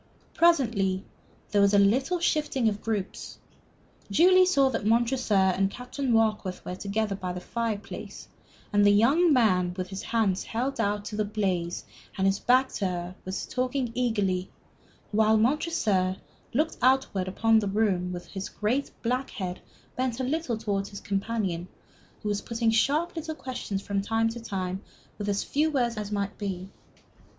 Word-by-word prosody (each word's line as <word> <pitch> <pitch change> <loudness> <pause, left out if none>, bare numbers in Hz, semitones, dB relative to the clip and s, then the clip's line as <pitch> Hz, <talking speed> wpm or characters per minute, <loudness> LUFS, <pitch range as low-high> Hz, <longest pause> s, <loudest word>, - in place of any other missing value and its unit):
Presently 230 - +2 0.5
there 205 - +4
was 200 0 +4
a - - +6
little 255 - +3
shifting 305 -7 +1
of 210 -1 -1
groups. 210 -4 -4 0.7
Julie 370 +2 +6
saw 275 -7 +4
that 225 - -2
Montresor 230 +1 +2
and 190 0 +3
Captain 250 +4 -4
Warkworth 215 -5 +1
were - - -4
together 200 +2 -2
by 185 -2 -4
the 180 - -5
fireplace, 225 +1 -5 0.4
that 205 -1 +4
the 205 - +6
young 280 +12 +4
man 185 -9 +3
with 185 -1 -3
his 190 0 -5
hands 210 -5 0
held 250 +3 -3
out 205 -1 -1
to 210 - -5
the 215 - +1
blaze 190 -5 -2 0.3
and 190 - +1
his 195 +1 +2
back 260 +2 +3
to 195 - -2
her 180 0 -4
was 185 +1 -3
talking 255 -1 -1
eagerly, 205 -7 0 0.6
while 220 +1 +4
Montresor, 215 - +1 0.3
looking 310 +6 0
outward 255 -7 +2
into 220 +2 +3
the - - -2
room, 180 -4 0
his 195 -1 -4
great 245 +7 -1
black 250 +3 0
head 180 -2 -5 0.4
bent 255 -1 -1
a - - -1
little 265 -3 -1
towards 200 -3 -2
his 200 - -8
companion, 195 -4 -2 0.6
was 205 -1 -1
putting 230 -1 0
sharp 295 +10 +1
little 320 -1 -4
questions 245 -9 -4
from 200 -1 -1
time 225 +2 +1
to 235 +1 -6
time, 190 -4 -4 0.4
with 205 0 -2
as 200 0 0
few 305 +3 +1
words 245 -6 0
as 210 -1 -5
might 200 -1 -2
be. 190 -2 -4
215 Hz, 160 wpm, -27 LUFS, 195-250 Hz, 0.7 s, a